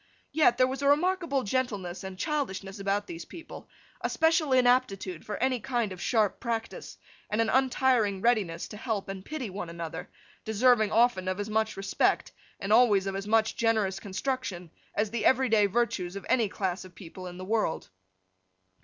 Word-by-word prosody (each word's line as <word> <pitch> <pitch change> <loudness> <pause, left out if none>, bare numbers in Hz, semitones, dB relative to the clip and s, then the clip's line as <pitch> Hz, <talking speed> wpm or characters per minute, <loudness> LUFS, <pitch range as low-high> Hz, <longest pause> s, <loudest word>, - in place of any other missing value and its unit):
Yet 300 -6 +4
there 255 - +5
was 265 +2 -4
a 280 - +1
remarkable 325 -2 +2
gentleness 205 -6 -2
and 190 -1 -7
childishness 200 - -3
about 200 +1 0
these 170 -3 -7
people, 330 - -11 0.3
a - - +1
special 320 -2 +2
inaptitude 245 -9 +2
for 210 - -5
any 255 -1 +1
kind 235 -2 -1
of 185 -2 -8
sharp 220 -5 +1
practice, 230 -2 -4 0.3
and 210 - -1
an 225 -1 +2
untiring 255 -6 +2
readiness 195 -7 +1
to 210 - -8
help 220 -4 -3
and 190 -1 -6
pity 265 -7 -5
one 185 -2 -5
another, 170 -1 -6 0.3
deserving 220 0 +3
often 230 -4 +3
of 185 +1 -1
as 205 +1 -4
much 220 -1 0
respect, 195 0 +1 0.3
and 200 +1 0
always 215 -5 +5
of 195 0 -3
as 195 +1 -4
much 220 0 +2
generous 220 -4 +1
construction, 200 - -4 0.2
as 210 0 0
the 235 -1 -2
every 260 0 +4
day 210 -2 +4
virtues 200 -4 -1
of 200 - -7
any 230 -5 +2
class 190 -2 -2
of 185 -2 -14
people 185 +1 -9
in 180 0 -8
the 185 - -7
world. 215 -5 -1
215 Hz, 180 wpm, -28 LUFS, 195-250 Hz, 0.3 s, there